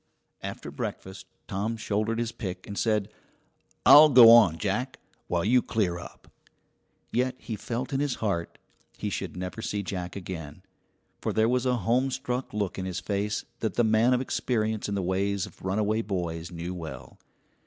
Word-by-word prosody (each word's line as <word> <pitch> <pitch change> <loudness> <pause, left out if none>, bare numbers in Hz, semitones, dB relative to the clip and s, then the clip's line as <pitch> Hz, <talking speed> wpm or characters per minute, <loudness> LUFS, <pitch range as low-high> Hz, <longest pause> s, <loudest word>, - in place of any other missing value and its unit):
After - - -6
breakfast 95 +1 -6 0.2
Tom 110 +4 -2
shouldered 110 +1 -1
his 115 -1 -1
pick 95 -5 -6
and 100 - -7
said: 105 -2 0 0.8
"I'll 150 +1 +10
go 120 -4 +9
on, 105 -9 +7
Jack, 120 +8 -2 0.3
while 85 0 0
you 125 +3 +4
clear 90 -8 -1
up." - - -12 0.8
Yet 125 +1 0
he 115 - -6
felt 120 +6 -4
in 135 - +1
his 145 -3 0
heart 90 -6 -2 0.4
he - - -3
should - - -4
never 90 +5 -5
see 105 -2 -2
Jack 90 -2 -5
again; 90 -3 -7 0.6
for - - -1
there 110 0 +2
was 125 +1 +1
a 125 -1 +2
homestruck 130 +3 0
look 100 -3 -2
in 95 - -3
his 95 -2 -3
face 105 0 -2
that 110 - -2
the 120 - +3
man 110 +3 +4
of 125 - 0
experience 110 -5 -1
in 100 - -1
the 100 - -1
ways 95 +1 0
of - - -15
runaway 105 +3 0
boys 85 -5 -3
knew 85 +1 -5
well. 70 -7 -8
105 Hz, 170 wpm, -27 LUFS, 95-120 Hz, 0.8 s, I'll